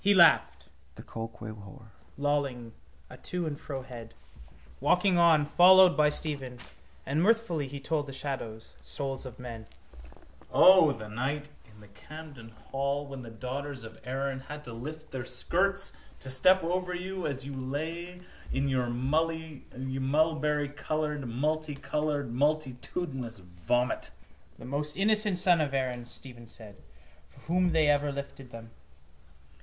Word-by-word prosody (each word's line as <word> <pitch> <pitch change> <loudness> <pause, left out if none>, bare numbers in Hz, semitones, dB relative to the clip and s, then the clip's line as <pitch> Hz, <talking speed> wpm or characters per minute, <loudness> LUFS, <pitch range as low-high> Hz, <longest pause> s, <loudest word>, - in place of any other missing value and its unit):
He 200 0 +5
laughed, 170 -3 +5 1.5
lolling 140 -5 -1 0.3
a - - -12
to 180 -1 -3
and 150 -2 -4
fro 135 -3 -5
head, 120 -3 -10 0.6
walking 180 0 +3
on, 160 -3 +6
followed 180 +3 +7
by 150 -1 +5
Stephen: 140 -5 -3 0.5
and 145 +4 +1
mirthfully 195 -8 +2
he 140 +1 -6
told 145 +1 -1
the - - -6
shadows, 130 -5 -5
souls 135 -2 -4
of 125 - -10
men: 115 -3 -8 0.8
—O, 185 -5 +7
the 110 -5 -6
night 135 +7 -2 0.2
in 105 0 -17
the 105 - -14
Camden 130 +3 -11
hall 140 +5 -3
when 135 -2 -8
the 120 - -9
daughters 130 +3 -5
of 110 0 -11
Erin 135 +1 -2
had 150 +3 -8
to 120 - -8
lift 155 +7 -7
their 130 -2 -4
skirts 195 +10 +1 0.3
to 130 - -1
step 185 +9 +5
over 180 +1 -1
you 185 -1 -3
as 135 -2 -2
you 140 - -6
lay 160 +7 -4 0.3
in 135 +1 0
your 130 -2 +1
mulberrycoloured, 150 +1 -1
multicoloured, 145 0 -1
multitudinous 135 -2 -1
vomit! 90 +7 -1 0.5
—The - - -10
most 150 +4 -3
innocent 210 -1 +3
son 175 -2 +4
of 140 -2 -1
Erin, 125 -2 -1
Stephen 120 -3 -9
said, 110 -2 -9 0.5
for - - -19
whom 180 +2 +2
they 160 -2 +4
ever 145 0 +3
lifted 140 -2 -7
them. 115 -1 -10
140 Hz, 135 wpm, -30 LUFS, 130-160 Hz, 1.5 s, followed